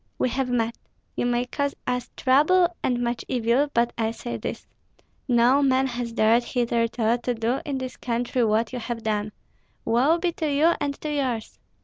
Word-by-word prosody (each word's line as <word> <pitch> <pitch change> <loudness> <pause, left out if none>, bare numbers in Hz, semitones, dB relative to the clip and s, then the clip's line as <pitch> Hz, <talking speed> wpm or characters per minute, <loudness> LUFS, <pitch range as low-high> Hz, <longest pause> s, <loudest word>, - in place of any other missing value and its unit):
We 255 - +1
have 260 +1 -1
met! 230 -2 -1 0.4
You - - 0
may 245 0 +1
cause 280 +2 -2
us 250 0 -2
trouble 340 +7 +4
and 245 -1 0
much 240 0 -2
evil, 245 +4 +1
but 235 -1 +1
I 220 -1 +1
say 235 +1 -5
this: - - -5 0.6
No 245 +2 +4
man 265 -1 +3
has 245 -2 -3
dared 230 +1 +3
hitherto 235 -1 0
to 245 - -1
do 230 +3 -1
in 280 -2 -1
this 260 -1 -6
country 245 +1 -1
what 220 +2 +1
you 250 - -3
have 230 -1 -5
done. 210 -1 -1 0.5
Woe 255 +9 +3
be 345 0 0
to 315 -2 -2
you 310 +4 +4
and 285 -1 -2
to 305 -1 -3
yours!" 255 -6 -2
245 Hz, 180 wpm, -25 LUFS, 235-275 Hz, 0.6 s, trouble